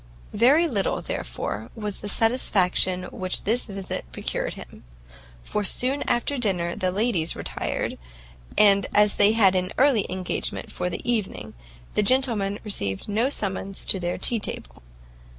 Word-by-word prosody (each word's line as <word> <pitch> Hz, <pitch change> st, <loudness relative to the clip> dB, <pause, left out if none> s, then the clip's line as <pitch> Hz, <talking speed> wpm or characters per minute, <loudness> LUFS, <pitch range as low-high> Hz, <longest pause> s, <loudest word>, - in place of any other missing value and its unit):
Very 275 Hz, +10 st, +5 dB
little, 205 Hz, -10 st, -1 dB
therefore, 105 Hz, -, -4 dB
was 210 Hz, -3 st, -5 dB
the 205 Hz, -, -6 dB
satisfaction 190 Hz, -5 st, +2 dB
which 185 Hz, -1 st, -1 dB
this 230 Hz, +4 st, +1 dB
visit 195 Hz, -2 st, -4 dB
procured -, -, -3 dB
him, -, -, -12 dB, 0.6 s
for 210 Hz, -, -2 dB
soon 260 Hz, +7 st, +3 dB
after 255 Hz, +3 st, 0 dB
dinner 180 Hz, -6 st, 0 dB
the 185 Hz, 0 st, -1 dB
ladies 190 Hz, -5 st, +1 dB
retired; -, -, -3 dB, 0.6 s
and 200 Hz, -2 st, +5 dB
as 210 Hz, 0 st, +4 dB
they 205 Hz, +1 st, +5 dB
had 200 Hz, -4 st, +5 dB
an 185 Hz, 0 st, -1 dB
early 260 Hz, -6 st, +4 dB
engagement 185 Hz, -1 st, -3 dB
for 180 Hz, -, -2 dB
the 180 Hz, -, -6 dB
evening, 225 Hz, -5 st, -2 dB, 0.4 s
the -, -, +2 dB
gentlemen 215 Hz, -4 st, +1 dB
received 100 Hz, -, -2 dB
no 220 Hz, +5 st, +1 dB
summons 195 Hz, -5 st, -2 dB
to 190 Hz, -, +2 dB
their 175 Hz, 0 st, -2 dB
tea 235 Hz, -, 0 dB
table. -, -, -6 dB
205 Hz, 145 wpm, -24 LUFS, 185-230 Hz, 0.6 s, Very